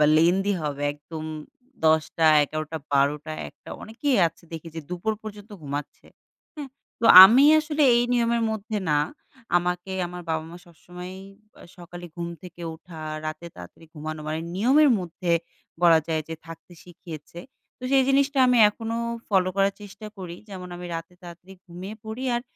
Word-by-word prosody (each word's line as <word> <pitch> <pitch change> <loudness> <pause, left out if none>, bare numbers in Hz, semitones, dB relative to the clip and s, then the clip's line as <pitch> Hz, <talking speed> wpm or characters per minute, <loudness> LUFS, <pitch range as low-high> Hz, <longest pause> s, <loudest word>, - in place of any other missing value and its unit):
বা 150 - +6
lengthy 190 +5 +3
হবে 145 -1 -3
একদম 155 +2 -9 0.6
10 160 0 +5
টা, 165 - +3 0.2
১১ 155 +2 -3
টা, 160 - -2
১২ 140 +1 +3
টা, 155 - -6 0.2
১ - - -20
টা - - -10
অনেকেই 250 +5 -1
আছে 165 +1 -9
দেখে 165 0 -7
যে 160 - -4
দুপুর 180 +5 -2
পর্যন্ত 210 0 -10
ঘুমাচ্ছে। 145 0 -6 0.5
হ্যাঁ? 290 -2 -6 0.3
তো 230 - +2 0.2
আমি 245 +8 +6 0.2
আসলে 305 -1 -1
এই 240 - +3
নিয়মের 235 -1 +1
মধ্যে 215 0 -3
না 150 - +3 0.6
আমাকে 180 +1 -2 0.2
আমার 180 0 -8
বাবা-মা 160 +2 -3
সবসময়ই 180 +2 -10 0.3
বা - - -19 0.2
সকালে 175 0 -10
ঘুম 170 0 -4
থেকে 175 -1 -11
ওঠা 165 0 -13 0.3
রাতে 155 +2 -6
তাড়াতাড়ি 90 - -13
ঘুমানো 155 0 -6
মানে 155 +1 -2
নিয়মের 265 +9 +4
মধ্যে 175 0 -4 0.5
বলা 165 -2 +7
যায় 160 -1 0
যে 165 - -4
থাকতে 165 +2 -12
শিখিয়েছে 170 -2 -11 0.4
তো - - -23
সেই 270 -1 +5
জিনিসটা 275 +1 +2
আমি 250 -1 +4
এখনো 225 +1 -5 0.3
follow 185 -3 +2
করার 195 0 +3
চেষ্টা 205 +1 -10
করি 175 -2 -7
যেমন 185 -2 -8
আমি 180 0 -7
রাতে 165 +2 -7
তাড়াতাড়ি 175 +2 -12
ঘুমিয়ে 185 +4 -8
পড়ি 220 +4 -6
আর 240 - -1
180 Hz, 170 wpm, -25 LUFS, 160-215 Hz, 0.6 s, বলা